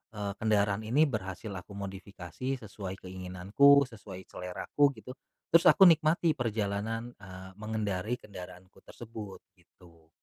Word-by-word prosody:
eee, 100 -1 -3
kendaraan 105 -1 +1
ini 140 +8 +4
berhasil 105 - -4
aku 95 +1 -8
modifikasi 100 +5 -5
sesuai 100 -2 -7
keinginanku, 95 +10 +3
sesuai 100 -4 -10
seleraku 135 +10 0
gitu. 125 - -9 0.4
Terus 165 - +6
aku - - +7
nikmati 160 0 +4
perjalanan, 115 0 -2
eee, 95 -1 -11
mengendarai 105 0 -2
kendaraanku 90 -3 -12
tersebut, 110 -4 -9 0.2
gitu. 85 -2 -22
100 Hz, 115 wpm, -30 LUFS, 95-115 Hz, 0.4 s, aku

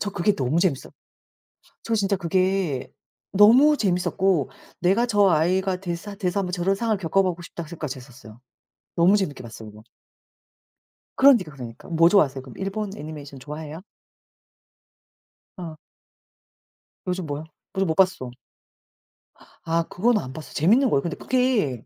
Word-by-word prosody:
저 205 - -2
그게 200 +2 +1
너무 135 +4 0
재밌어. 170 -7 0 0.9
저 230 - -1
진짜 200 -1 +1
그게 185 -5 0 0.4
너무 245 +10 +6
재밌었고 180 - 0 0.3
'내가 195 +7 +2
저 205 -4 +4
아이가 185 +3 +1
되사 180 +2 -5
돼서 195 -1 -2
1 - - -3
번 180 - -5
저런 180 +2 0
상황을 220 -1 -1
겪어 195 +2 +2
보고 180 -2 -2
싶다.' 170 0 -8
생각까지 155 -4 -6
했었어요. 120 -3 -14 0.6
너무 180 +4 +5
재밌게 175 -9 -3
봤어요 110 -2 -10
그거. 105 - -15 1.3
그러니까, 245 - +5
그러니까. 120 -4 -10
뭐 165 0 +4
좋아하세요 140 -9 +3
그럼? 130 -2 -13
일본 195 +2 -3
애니메이션 145 -3 -9
좋아해요? 150 +4 -8 1.7
어. 165 -4 -7 1.3
요즘 180 -1 -2
뭐야? 145 0 -5 0.3
뭐지 195 0 0
못 160 - -1
봤어. 185 -10 +2 1.3
아 165 +1 +1
그건 230 +5 +2
안 130 -8 -7
봤어. 155 +1 -10
재밌는 230 - +3
거예요? 140 - +2
근데 170 +1 -4
그게 235 - 0
175 Hz, 310 characters per minute, -24 LUFS, 150-195 Hz, 1.7 s, 너무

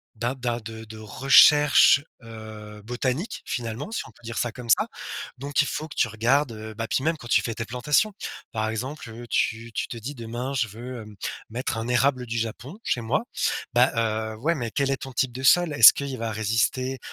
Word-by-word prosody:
d'a 120 +3 -1
d'a 120 -2 -2
de 110 0 -8
de 110 0 -11
recherche, 135 +6 +6 0.2
heu, 110 -2 -10
botanique, 130 - -3
finalement, 120 - -4
si 230 - -2
on - - -15
peut - - -24
dire 115 +1 -6
ça 120 - 0
comme 125 -2 -9
ça. - - +4 0.5
Donc 140 +3 +1
il 145 - -1
faut 155 - -4
que - - -10
tu - - +3
regardes, 120 +4 +1
heu, 110 0 -8
bah, 115 +1 -4
puis 130 - 0
même, 160 +1 +1
quand 120 - -11
tu - - +4
fais 115 - -3
tes 115 - -4
plantations. 140 - +1 0.4
Par 110 0 -1
exemple, 125 +4 -5
heu, 120 +2 -9
tu 115 +1 0
tu - - -2
te 120 - -6
dis: 130 +6 -6
«Demain, 120 +3 -5
je 130 -5 +1
veux, 120 +3 -8
hem, 105 -1 -12 0.3
mettre 120 0 -3
un 115 +1 -3
érable 125 +1 +2
du 115 +1 -3
Japon 115 - -4
chez 120 - 0
moi». 130 - -1 0.5
Bah, 125 +2 +5 0.4
heu, - - -7
ouais, 165 +8 0
mais 120 -5 -4
quel 140 +3 0
est - - +2
ton 135 -1 -8
type 125 0 0
de 130 +2 -6
sol? 175 +2 +5
Est-ce - - +10
qu'il 140 -2 -4
va 115 -1 -3
résister, 115 +5 0
120 Hz, 215 wpm, -25 LUFS, 115-135 Hz, 0.5 s, Est-ce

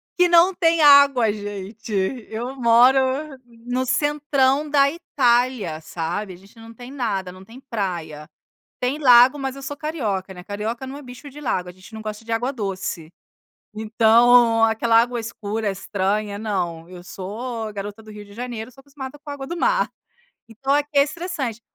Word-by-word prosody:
que 360 0 +4
não 345 +2 +5
tem 335 -2 +2
água 280 -7 +6
gente, 205 +2 -8 0.4
eu 240 +4 -5
moro 245 +2 +5 0.7
no 250 +1 -1
centrão 285 +1 +1
da 280 -1 +4
Itália, 245 - 0
sabe? 175 +5 -4
A - - -11
gente 195 +4 -20
não 225 0 -12
tem 245 +3 -11
nada, 200 -9 -3
não 185 +1 -13
tem 230 +6 -14
praia, 170 - -5 0.5
tem 255 +4 0
lago 255 -1 +6
mas 270 -1 -4
eu 275 - -10
sou 290 +2 -6
carioca, 215 - -3
né, 180 - -11
carioca 220 +6 -5
não 275 +2 -7
é - - -10
bicho 250 +3 -11
de 285 +2 -12
lago 180 -10 -2
a - - -8
gente 185 +4 -17
não 220 - -7
gosta 215 +1 -7
de 230 - -7
água 240 +4 0
doce. 190 - -5 0.7
Então 230 +1 +4
aquela 225 +1 +3
água 240 0 +1
escura 220 -1 -4
estranha 200 +2 -2
não, 175 -6 -3
eu 180 -1 -11
sou 220 +5 -6
garota 205 +2 -7
do 215 - -14
Rio 210 0 -10
de 200 - -16
Janeiro 240 +1 -6
sou 270 - -17
acostumada 275 0 -9
com 295 - -16
a 285 - -4
água 270 -1 -7
do 345 - -5
mar. 485 +8 +1 0.6
Então 270 +5 -2
aqui 290 0 +1
é 280 - +6
estressante, 295 - -5
235 Hz, 175 wpm, -22 LUFS, 205-270 Hz, 0.7 s, água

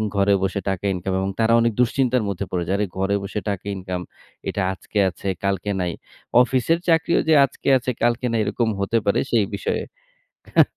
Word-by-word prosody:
ঘরে 100 0 +3
বসে 95 +1 0
টাকা 95 +1 -2
ইনকাম 95 +1 -3
এবং 95 - -1
তারা 115 +1 +3
অনেক 115 -1 +2
দুশ্চিন্তার 125 -1 +2
মধ্যে 100 0 -3
পড়ে 90 -1 -1
যায়। 95 - +1
আরে 105 - +2
ঘরে 95 +1 +1
বসে 100 +2 -3
টাকা 100 -1 -4
ইনকাম 90 -1 -4 0.5
এটা 100 - -2
আজকে 105 - -8
আছে, 95 - -8 0.2
কালকে 100 +1 -1
নাই। 90 - -1 0.5
অফিসের 130 +6 +2
চাকরিও 165 +1 +3
যে, - - +6
আজকে 135 - -10
আছে 125 0 -2
কালকে 120 +1 +1
নাই 115 - +1
এরকম 115 -2 0
হতে 110 +4 +1
পারে 100 - +2
সেই 110 -4 +3
বিষয়ে - - -2 0.6
অ্যা - - -18
হা। - - +9
100 Hz, 195 wpm, -22 LUFS, 95-120 Hz, 0.6 s, হা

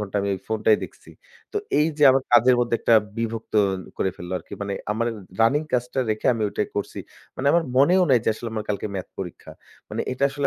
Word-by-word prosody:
ঘণ্টা 105 -1 -4
আমি 100 - -2
ওই 95 - -8
ফোনটাই 110 0 +3
দেখছি। - - -14 0.4
তো - - -4 0.2
এইযে 150 -1 +1
আমার 135 0 +2
কাজের 120 +1 +6
মধ্যে 120 -1 0
একটা 115 - +4 0.2
বিভক্ত 115 -1 -4 0.4
করে 95 - +1
ফেললো 90 +1 -7
আরকি। - - -18
মানে 100 - -3 0.2
আমার 115 +2 -1 0.3
রানিং 140 +7 +4
কাজটা 125 +1 -1
রেখে 110 0 -2
আমি 110 - -3
ওইটাই 105 - -2
করছি। 100 - -3 0.4
মানে 130 - -3
আমার 170 -1 +3
মনেও 175 +8 +5
নাই 125 - +6
যে - - +1
আসলে 115 +1 -6
আমার 110 -1 -3
কালকে 100 +1 -2
ম্যাথ 95 - -5
পরীক্ষা। 90 -3 -7 0.4
মানে - - -3
এটা 135 +2 0
আসলে 140 0 -1
115 Hz, 205 wpm, -23 LUFS, 105-135 Hz, 0.4 s, কাজের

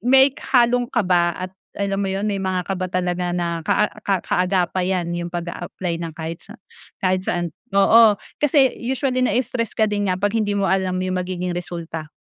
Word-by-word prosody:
may 265 +4 +6 0.2
halong 245 -1 +4
kaba 180 -8 +2
at 185 0 -6 0.2
alam 200 0 -1
mo 195 - -1
yun 195 +2 -2
may 200 -2 -1
mga 185 -1 -1
kaba 185 -1 -3
talaga 180 -1 -1
na 170 -1 -1
kaa 185 +6 +2 0.2
ka 195 -4 -1
kaagapay 185 0 +1
yan, 175 -1 -2
yung 175 0 -3
pag-aapply 175 0 -4
ng 165 -2 -4
kahit 165 +1 -5
sa 215 +3 -13
ng - - -41 0.4
kahit 185 0 +2
saan. 175 -2 -1 0.3
Oo, 215 +1 +6 0.2
kasi 280 -3 +4
usually 255 +1 -1
na-stress 245 -2 0
ka 220 - +4
din 205 -2 -1
nga 185 - +1
'pag 205 +2 0
hindi 205 -2 0
mo 200 - +1
alam 190 -1 +1
yung 185 0 -1
magiging 180 0 -3
resulta, 170 -3 -5
185 Hz, 185 wpm, -21 LUFS, 175-215 Hz, 0.4 s, may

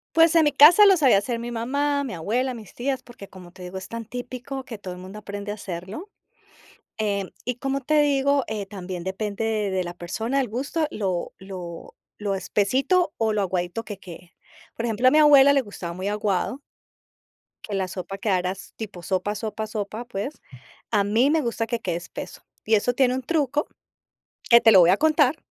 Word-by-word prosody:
Pues, 330 0 +6
en 325 - +6
mi 295 - +2
casa 345 +8 +8
lo 390 -2 +7
sabía 265 -10 +5
hacer 230 +3 -3
mi 240 - -5
mamá, 280 +5 0
mi 245 - -5
abuela, 245 +10 -1
mis 215 -5 -11
tías, 260 +1 -2
porque, 240 -5 -12
como 180 -2 -13
te 180 +1 -12
digo, 180 +1 -6
es 190 - -9
tan 230 0 -6
típico 250 +3 -6
que 230 -3 -8
todo 185 -3 -7
el 180 - -11
mundo 190 +3 -9
aprende 205 0 -6
a - - -2
hacerlo. 190 - -7 0.9
Em, 200 -3 -1 0.2
y, 250 -1 -2
como 270 +2 -2
te 300 +3 +3
digo, 280 -1 +2
eh, 215 -2 -4
también 185 -3 -7
depende 200 +3 -3 0.3
de 185 -1 -1
la 175 - -5
persona, 220 +10 -2
el 260 - -1
gusto, 280 +8 -2
lo 185 -4 -3
lo 180 -3 -9 0.2
lo 205 -2 -2
espesito 260 - +1
o 220 -1 +1
lo 205 - +1
aguadito 185 +3 -2
que 205 -3 -7
quede. 180 -2 -12 0.4
Por 235 - -3
ejemplo, 230 +2 0
a - - +6
mi 305 - +4
abuela 280 -2 +7
le 280 - +4
gustaba 200 -7 -7
muy 185 +3 -4
aguado 210 +5 -1 1.0
que 210 - -5
la 190 -1 -1
sopa 190 +1 -6
quedaras 190 -1 -2
tipo 205 -5 -7
sopa, 190 +3 -1
sopa, 220 +1 -4
sopa, 215 +1 -5
pues. 240 +6 -5 0.5
A 210 -3 +3
mí 225 +7 +3
me 320 +1 +3
gusta 235 -3 -2
que 235 0 -2
quede 175 -5 -2
espeso. 175 - -8 0.2
Y 220 - +3
eso 220 +4 +2
tiene 255 -1 +3
un 260 - -3
truco, 295 0 0 0.8
que 235 0 +8
te 225 - +6
lo 195 - +8
voy 170 0 +6
a 190 - +5
contar, 305 0 +3
220 Hz, 200 wpm, -24 LUFS, 190-265 Hz, 1.0 s, casa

